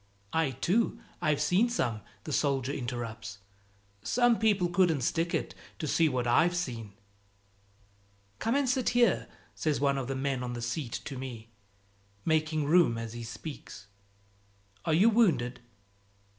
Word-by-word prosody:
"I 160 Hz, -3 st, +2 dB
too, 190 Hz, -, 0 dB, 0.2 s
I've 155 Hz, -3 st, +2 dB
seen 180 Hz, +10 st, +3 dB
some!" 120 Hz, -, -1 dB, 0.2 s
the -, -, -5 dB
soldier 140 Hz, -2 st, +1 dB
interrupts; 120 Hz, -6 st, -5 dB, 0.6 s
"some 240 Hz, -, +3 dB
people 205 Hz, -5 st, +3 dB
couldn't 175 Hz, -5 st, +2 dB
stick 165 Hz, +7 st, 0 dB
it, -, -, -2 dB, 0.2 s
to -, -, -4 dB
see 160 Hz, +1 st, +3 dB
what 125 Hz, -3 st, -1 dB
I've 165 Hz, +9 st, +3 dB
seen." 115 Hz, -, -4 dB, 1.5 s
"Come 230 Hz, +3 st, 0 dB
and 280 Hz, -1 st, +2 dB
sit 255 Hz, 0 st, +1 dB
here," 235 Hz, -6 st, +3 dB, 0.3 s
says 155 Hz, -2 st, -1 dB
one 140 Hz, 0 st, +2 dB
of 130 Hz, -, -4 dB
the 135 Hz, -, -2 dB
men 135 Hz, -1 st, -1 dB
on 125 Hz, -1 st, -4 dB
the 120 Hz, -, -5 dB
seat 120 Hz, 0 st, -3 dB
to 135 Hz, -3 st, -5 dB
me, 115 Hz, -4 st, -7 dB, 0.7 s
making 155 Hz, -1 st, +1 dB
room 155 Hz, -6 st, +4 dB
as 115 Hz, -1 st, -5 dB
he 120 Hz, -, -6 dB
speaks. 115 Hz, -, -8 dB, 1.0 s
"Are 160 Hz, -, +2 dB
you 195 Hz, +7 st, +5 dB
wounded?" 165 Hz, -, +2 dB
145 Hz, 145 wpm, -30 LUFS, 120-175 Hz, 1.5 s, you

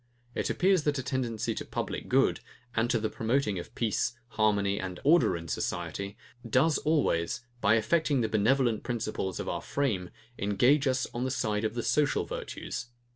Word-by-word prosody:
It -, -, -1 dB
appears 190 Hz, -1 st, +3 dB
that 145 Hz, -1 st, +1 dB
a 130 Hz, -, -2 dB
tendency 120 Hz, -4 st, -1 dB
to -, -, -4 dB
public -, -, -4 dB
good, -, -, +3 dB, 0.4 s
and 115 Hz, +1 st, +2 dB
to 120 Hz, -2 st, +2 dB
the 110 Hz, -, 0 dB
promoting 110 Hz, -3 st, 0 dB
of 85 Hz, -, -10 dB
peace, 120 Hz, +2 st, 0 dB, 0.2 s
harmony, 100 Hz, -3 st, +1 dB
and 90 Hz, -2 st, -5 dB
order 155 Hz, -, +4 dB
in 85 Hz, 0 st, -8 dB
society, 90 Hz, -, -3 dB, 0.3 s
does 140 Hz, +7 st, +3 dB
always, 145 Hz, -, +1 dB, 0.2 s
by 110 Hz, -, +5 dB
affecting 145 Hz, +3 st, +2 dB
the 110 Hz, -, +1 dB
benevolent 115 Hz, +2 st, +2 dB
principles 110 Hz, -6 st, -3 dB
of -, -, -4 dB
our -, -, -2 dB
frame, 105 Hz, -11 st, -1 dB, 0.3 s
engage 125 Hz, +8 st, +3 dB
us 130 Hz, -1 st, +1 dB
on 120 Hz, -, -2 dB
the 130 Hz, -, 0 dB
side 110 Hz, -5 st, -1 dB
of 110 Hz, +1 st, -1 dB
the 120 Hz, -, -2 dB
social 145 Hz, -1 st, +2 dB
virtues. -, -, -5 dB
115 Hz, 175 wpm, -29 LUFS, 105-135 Hz, 0.4 s, by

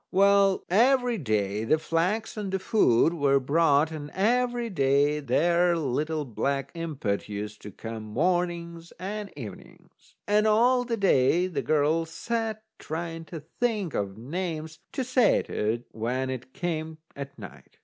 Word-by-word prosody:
Well, 195 Hz, 0 st, +4 dB
every 245 Hz, +3 st, +3 dB
day 105 Hz, -, -1 dB
the 135 Hz, +8 st, +3 dB
flax 180 Hz, +8 st, -1 dB
and 205 Hz, -3 st, -4 dB
the 190 Hz, -, +1 dB
food 170 Hz, -, +3 dB
were 140 Hz, -4 st, +3 dB
brought, 150 Hz, +2 st, +3 dB
and 150 Hz, -2 st, -6 dB
every 240 Hz, +3 st, +1 dB
day 145 Hz, -4 st, +2 dB
that 140 Hz, -, -12 dB
there 170 Hz, +6 st, +3 dB
little 150 Hz, +1 st, -1 dB
black 135 Hz, +3 st, -2 dB
impet 145 Hz, -13 st, -3 dB
used 105 Hz, 0 st, -6 dB
to 105 Hz, -, -9 dB
come 110 Hz, +2 st, -7 dB
mornings 170 Hz, +6 st, -1 dB
and 205 Hz, +2 st, -5 dB
evenings. 105 Hz, -8 st, -12 dB
And 210 Hz, +1 st, +3 dB
all 245 Hz, +4 st, +4 dB
the 235 Hz, -1 st, -2 dB
day 175 Hz, -3 st, +3 dB
the 185 Hz, -, -2 dB
girl 155 Hz, +2 st, +1 dB
sat 220 Hz, +5 st, -3 dB, 0.2 s
trying 165 Hz, +1 st, -5 dB
to 160 Hz, -1 st, -8 dB, 0.2 s
think 215 Hz, -, 0 dB
of 100 Hz, 0 st, -3 dB
names 160 Hz, +4 st, -4 dB
to 260 Hz, -, -1 dB
say 255 Hz, -3 st, +3 dB
to 105 Hz, +1 st, -1 dB
it 120 Hz, +1 st, -7 dB
when 125 Hz, +4 st, -2 dB
it 130 Hz, 0 st, -7 dB
came 160 Hz, 0 st, -3 dB, 0.2 s
at 140 Hz, 0 st, -8 dB
night. 100 Hz, -5 st, -12 dB
165 Hz, 150 wpm, -27 LUFS, 135-195 Hz, 0.2 s, Well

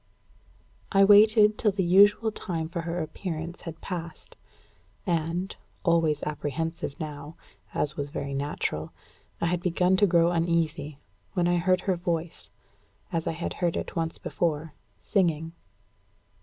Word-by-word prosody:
I 195 Hz, -1 st, +5 dB
waited 210 Hz, +1 st, +6 dB
till 210 Hz, -, +3 dB
the 190 Hz, -1 st, -1 dB
usual 205 Hz, +5 st, +5 dB
time 165 Hz, -6 st, -4 dB
for 170 Hz, 0 st, -3 dB
her 170 Hz, 0 st, -2 dB
appearance 165 Hz, +1 st, -5 dB
had 165 Hz, -1 st, -8 dB
passed; 170 Hz, -4 st, -7 dB, 0.7 s
and, 170 Hz, +2 st, -1 dB, 0.3 s
always 165 Hz, -4 st, +2 dB
apprehensive 150 Hz, 0 st, -3 dB
now, 150 Hz, 0 st, -6 dB, 0.4 s
as 150 Hz, 0 st, -1 dB
was 145 Hz, -1 st, -3 dB
very 140 Hz, 0 st, -4 dB
natural, 135 Hz, -, -3 dB, 0.5 s
I -, -, 0 dB
had 175 Hz, +1 st, 0 dB
begun 180 Hz, +1 st, +2 dB
to 205 Hz, -, +5 dB
grow 170 Hz, -1 st, +4 dB
uneasy, 165 Hz, -4 st, 0 dB, 0.4 s
when 175 Hz, -3 st, +1 dB
I 175 Hz, 0 st, +3 dB
heard 185 Hz, +1 st, +2 dB
her 190 Hz, -1 st, 0 dB
voice, 170 Hz, -1 st, -3 dB, 0.6 s
as 165 Hz, -1 st, -2 dB
I -, -, 0 dB
had 170 Hz, +2 st, -4 dB
heard 170 Hz, -2 st, +1 dB
it -, -, -5 dB
once 165 Hz, -1 st, 0 dB
before, 160 Hz, -2 st, -2 dB, 0.3 s
singing. 165 Hz, -5 st, +1 dB
170 Hz, 140 wpm, -27 LUFS, 160-180 Hz, 0.7 s, waited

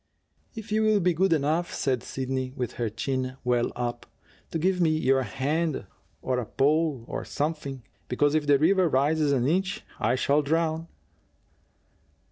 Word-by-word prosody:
"If 220 Hz, -1 st, -8 dB
you 215 Hz, +1 st, +2 dB
will 215 Hz, -1 st, +4 dB
be 180 Hz, -1 st, +2 dB
good 185 Hz, +3 st, +2 dB
enough," 160 Hz, +3 st, +1 dB
said 130 Hz, -4 st, 0 dB
Sidney, 130 Hz, -1 st, -3 dB
with 125 Hz, -3 st, -3 dB
her 115 Hz, -, +1 dB
chin 130 Hz, +4 st, -3 dB
well 125 Hz, -1 st, +1 dB
up, 120 Hz, -1 st, -4 dB, 0.4 s
"to -, -, -2 dB
give 180 Hz, +3 st, +1 dB
me 165 Hz, -, +4 dB
your 135 Hz, -4 st, +2 dB
hand 145 Hz, -, -1 dB, 0.4 s
or 130 Hz, -1 st, 0 dB
a 120 Hz, -, -3 dB
pole 145 Hz, -2 st, +1 dB
or -, -, -4 dB
something 145 Hz, -4 st, -3 dB, 0.2 s
because 145 Hz, +4 st, +2 dB
if 155 Hz, -2 st, +1 dB
the 145 Hz, -1 st, +6 dB
river 180 Hz, +4 st, +3 dB
rises 145 Hz, +2 st, +2 dB
an 130 Hz, -2 st, +2 dB
inch 190 Hz, +5 st, 0 dB, 0.2 s
I 115 Hz, +4 st, +2 dB
shall 140 Hz, +3 st, +2 dB
drown." 160 Hz, +2 st, 0 dB
145 Hz, 160 wpm, -27 LUFS, 130-165 Hz, 0.4 s, the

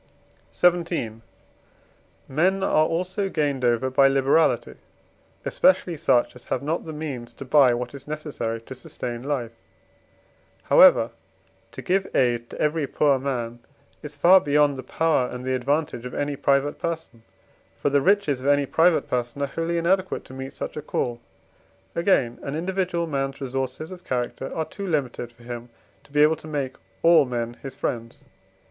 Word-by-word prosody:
XVII. 170 Hz, -11 st, +1 dB, 1.1 s
Men 185 Hz, +7 st, +1 dB
are 155 Hz, -4 st, +3 dB
also 185 Hz, +4 st, -2 dB
gained 145 Hz, -6 st, -1 dB
over 120 Hz, +2 st, +2 dB
by 135 Hz, +1 st, +5 dB
liberality, 135 Hz, +4 st, +2 dB, 0.7 s
especially 230 Hz, -11 st, +2 dB
such 125 Hz, -6 st, +2 dB
as 125 Hz, -, -13 dB
have 130 Hz, -, -2 dB
not 160 Hz, +4 st, -2 dB
the 160 Hz, -, -6 dB
means 145 Hz, -6 st, -6 dB
to 135 Hz, -, -9 dB
buy 130 Hz, -2 st, +5 dB
what 120 Hz, +1 st, -5 dB
is 140 Hz, -, -10 dB
necessary 145 Hz, -7 st, -4 dB
to 125 Hz, -, -9 dB
sustain 120 Hz, -2 st, -6 dB
life. 130 Hz, -4 st, -2 dB, 1.1 s
However, 115 Hz, +1 st, +6 dB, 0.6 s
to -, -, -7 dB
give 190 Hz, +1 st, +1 dB
aid 120 Hz, -2 st, +1 dB
to -, -, -10 dB
every 150 Hz, -1 st, 0 dB
poor 140 Hz, -2 st, +2 dB
man 120 Hz, -3 st, -3 dB, 0.4 s
is 150 Hz, -1 st, -9 dB
far 180 Hz, +6 st, +6 dB
beyond 145 Hz, 0 st, +3 dB
the 130 Hz, -, -6 dB
power 140 Hz, -1 st, +1 dB
and 125 Hz, 0 st, -7 dB
the 130 Hz, -, 0 dB
advantage 135 Hz, -1 st, -1 dB
of -, -, -9 dB
any 145 Hz, 0 st, -1 dB
private 140 Hz, +1 st, +1 dB
person. 160 Hz, -8 st, -5 dB, 0.6 s
For 145 Hz, -, 0 dB
the 140 Hz, 0 st, +3 dB
riches 180 Hz, -7 st, +2 dB
of 135 Hz, -, -4 dB
any 145 Hz, 0 st, +4 dB
private 165 Hz, +4 st, +3 dB
person 125 Hz, +3 st, -2 dB
are 140 Hz, -, -4 dB
wholly 165 Hz, +1 st, -1 dB
inadequate 185 Hz, +3 st, 0 dB
to -, -, -12 dB
meet 135 Hz, +1 st, -7 dB
such -, -, -6 dB
a 150 Hz, -, -4 dB
call. 120 Hz, -5 st, -3 dB, 0.7 s
Again, 150 Hz, -9 st, +1 dB
an 140 Hz, -, -4 dB
individual 180 Hz, 0 st, -1 dB
man's 135 Hz, -3 st, -3 dB
resources 135 Hz, +4 st, -4 dB
of 180 Hz, -1 st, -10 dB
character 125 Hz, +1 st, -3 dB
are 160 Hz, -, -1 dB
too 200 Hz, +4 st, -7 dB
limited 130 Hz, -7 st, -2 dB
for 120 Hz, 0 st, -20 dB
him 120 Hz, 0 st, -7 dB, 0.4 s
to -, -, -22 dB
be 150 Hz, +1 st, +4 dB
able 155 Hz, +1 st, +4 dB
to 155 Hz, -, -12 dB
make 140 Hz, -4 st, -3 dB, 0.3 s
all 170 Hz, -2 st, +7 dB
men 120 Hz, -2 st, -3 dB
his 135 Hz, -2 st, -7 dB
friends. 115 Hz, -4 st, -4 dB
140 Hz, 165 wpm, -24 LUFS, 125-160 Hz, 1.1 s, all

